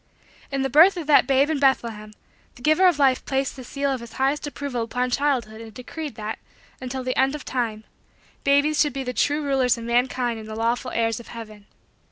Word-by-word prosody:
In 275 -1 -1
the 270 - 0
birth 345 +7 +6
of 335 - -4
that 290 -4 +5
babe 275 +1 +3
in 305 - -1
Bethlehem, 230 -6 0 0.4
the 245 - -15
Giver 310 +5 +5
of 350 -5 +3
Life 270 -3 +3
placed 270 0 -1
the 260 - -9
seal 280 +3 -2
of 265 - -2
his 235 -1 -11
highest 275 +3 0
approval 280 -4 -4
upon 250 +2 -2
childhood 245 -6 -1
and 225 -1 -10
decreed 280 +4 -7
that, 215 -1 -5 0.4
until 260 0 -4
the 255 0 -2
end 270 +2 +2
of 300 - -8
time, 225 -4 -2 0.6
babies 285 +1 +3
should 295 -3 +1
be 270 0 -3
the 250 -1 -4
true 295 +4 +1
rulers 265 -4 +2
of 230 - -7
mankind 240 0 0
and 220 0 -10
the 215 - -6
lawful 235 +3 -1
heirs 225 -1 -1
of 235 - -12
heaven. 215 -3 -10
260 Hz, 215 wpm, -23 LUFS, 230-280 Hz, 0.6 s, birth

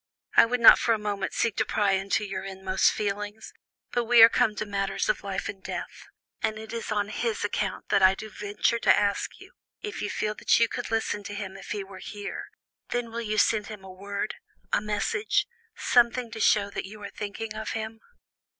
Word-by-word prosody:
I - - +8
would 250 +1 0
not 235 - +9
for 230 - +2
a - - -3
moment 205 -2 -3
seek 230 -3 0
to - - +3
pry 205 -2 +1
into 195 +3 0
your 190 -1 -4
inmost 190 -1 +1
feelings, 205 +1 -4 0.4
but 240 -1 0
we 235 0 +8
are 225 - +11
come 230 -3 +2
to 215 - -3
matters 195 -1 -1
of - - +1
life 195 -1 -3
and 195 - -7
death, - - -6 0.3
and 220 0 -1
it 220 +1 -8
is 230 -1 -4
on 205 -1 0
his 225 -1 -2
account 205 -2 -3
that - - +3
I 190 0 +6
do 215 - -7
venture 210 +3 0
to - - +5
ask 205 -1 0
you, - - -15 0.3
if 420 -1 -5
you 205 - -2
feel 210 0 -1
that - - +2
you 230 - +5
could - - -5
listen 220 -2 -1
to 205 - -6
him 195 -2 -5
if 195 - -11
he 205 -1 -3
were 190 -1 -11
here, 205 0 -6 0.4
then 245 -1 -2
will 235 +1 -3
you 215 -1 -2
send 210 -1 +3
him 210 -3 -9
a 190 - -10
word, 200 +4 -4 0.4
a - - +3
message, 215 - 0 0.3
something 240 0 +2
to 225 - -7
show 205 -1 +3
that - - -4
you 210 +2 -10
are 200 - -6
thinking 210 +2 -5
of 220 0 -4
him?" 220 0 -5
210 Hz, 215 wpm, -27 LUFS, 200-225 Hz, 0.4 s, are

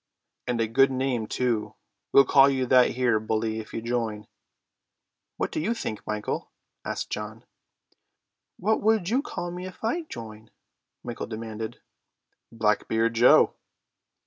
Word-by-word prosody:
"And 120 -1 -1
a 115 - +1
good 135 +5 +4
name 130 -4 -1
too. 110 -4 -1 0.4
We'll 140 - +7
call 135 +1 +6
you 130 -2 0
that 125 0 +5
here, 120 -3 +2
bully, 110 +1 -1
if 110 - -9
you 115 - -5
join." 115 -3 -2 1.1
"What - - -1
do - - -2
you 215 +10 0
think, 110 - -5
Michael?" 105 0 -3 0.3
asked - - -4
John. 105 +1 -5 1.1
"What 215 +4 +1
would 215 -4 +2
you 250 +5 +2
call 175 -11 -5
me 180 +1 -6
if 185 - -13
I 320 +10 -1
join?" 110 -1 -9 0.5
Michael - - -5
demanded. 110 -1 -6 0.7
"Blackbeard 110 +1 +1
Joe." 120 +2 +6
115 Hz, 140 wpm, -26 LUFS, 110-135 Hz, 1.1 s, We'll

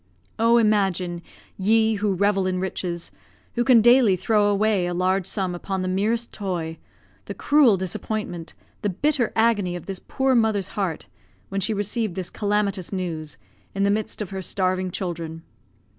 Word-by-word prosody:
Oh! 230 +1 +5
imagine, 190 -6 +1 0.4
ye 220 +2 +3
who 205 -1 0
revel 195 0 +2
in 185 -1 -1
riches 180 -2 -4 0.4
who 240 - +1
can 240 -3 +6
daily 240 -3 +6
throw 205 +3 +2
away 205 -2 +2
a 175 - -2
large 185 +1 +1
sum 190 -4 -2
upon 190 +1 -3
the - - -2
merest 215 +5 0
toy 170 -5 -4 0.5
the - - -6
cruel 285 -9 +4
disappointment, 185 -1 -4 0.3
the 205 - 0
bitter 260 - 0
agony 215 -6 +2
of 175 - -7
this 195 -2 -5
poor 265 0 +1
mother's 220 -5 +2
heart, 190 -6 -3 0.4
when 195 0 -2
she 225 - 0
received 210 -1 -1
this 185 -2 -4
calamitous 205 -3 -1
news, 165 -6 -4 0.4
in 195 - +1
the 200 - +3
midst 215 0 -2
of 200 - -10
her 190 0 -4
starving 185 0 0
children. 165 -3 -5
195 Hz, 160 wpm, -24 LUFS, 185-220 Hz, 0.5 s, can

